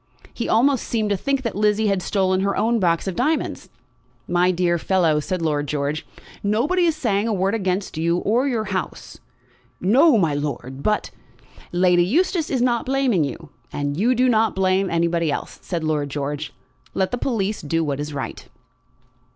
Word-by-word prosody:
He 235 - -4
almost 260 +2 +2
seemed 215 -3 -1
to - - +3
think 275 +7 -1
that 230 - -3
Lizzie 210 +1 +2
had 195 -3 +1
stolen 185 -1 +1
her 200 0 0
own 230 +1 +2
box 170 -4 +1
of 190 - -2
diamonds. 315 - -1 0.6
"My 175 +1 +2
dear 175 -1 +1
fellow," 165 -4 +2
said 180 +3 -3
Lord 150 -2 0
George, 145 +2 -2 0.3
"nobody 270 - +1
is 325 -2 +2
saying 220 -8 0
a 225 - 0
word 195 +1 0
against 190 -5 -2
you, 170 +1 +1
or 235 +9 +1
your 235 -5 0
house." 190 -3 -5 0.6
"No, 260 - +5
my 165 -7 +2
lord; 140 -2 -4
but 210 +5 0 0.3
" - - -23
"Lady 175 0 +4
Eustace 325 - +1
is 255 -3 +1
not 240 -2 0
blaming 260 - +2
you, 145 +2 -6 0.2
and 145 0 -2
do 245 +7 +2
not 225 -2 +3
you - - -21
blame 190 0 +1
anybody 170 -1 +1
else," - - -5
said 170 -3 -4
Lord 150 -2 -1
George. 145 +1 -4 0.4
"Let 190 -1 0
the 245 - -2
police 215 -5 -1
do 165 +2 -1
what 145 -3 -2
is 150 +1 -4
right." 140 -2 -6
190 Hz, 180 wpm, -22 LUFS, 165-230 Hz, 0.6 s, No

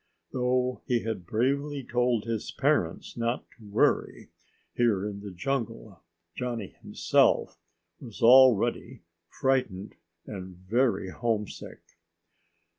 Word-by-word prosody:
Though 125 0 0
he 120 -2 +1
had 105 -6 -4
bravely 140 +6 0
told 120 -2 +1
his 115 -2 -3
parents - - 0
not 115 +1 -2
to 115 - -19
worry, 100 - +1 0.4
here 110 -5 +1
in 100 -1 -6
the 100 0 -8
jungle, 110 -1 -4 0.3
Johnny, 120 -5 -4
himself, - - +2 0.4
was 115 -4 -11
already 125 -2 +5 0.3
frightened 120 -7 -1 0.3
and 95 -3 -8
very 100 0 0
homesick. 110 -2 -3
115 Hz, 105 wpm, -28 LUFS, 100-125 Hz, 0.4 s, already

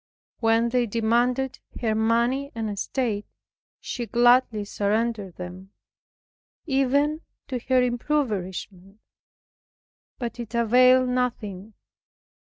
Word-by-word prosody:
When 225 +1 +3
they 245 0 +1
demanded 240 +4 0 0.2
her 225 -3 0
money 235 +5 +1
and 220 -2 -2
estate, 210 +1 -2 0.5
she 240 -2 -5
gladly 240 -3 +3
surrendered 205 -2 -1
them, 185 +2 -9 0.9
even 285 +2 +1 0.3
to 255 -2 -2
her 255 -1 +4
impoverishment, 210 -7 -2 1.2
but 240 -1 -5
it 235 0 -6
availed 250 +2 +5
nothing. 220 -5 -3
235 Hz, 90 wpm, -25 LUFS, 210-255 Hz, 1.2 s, availed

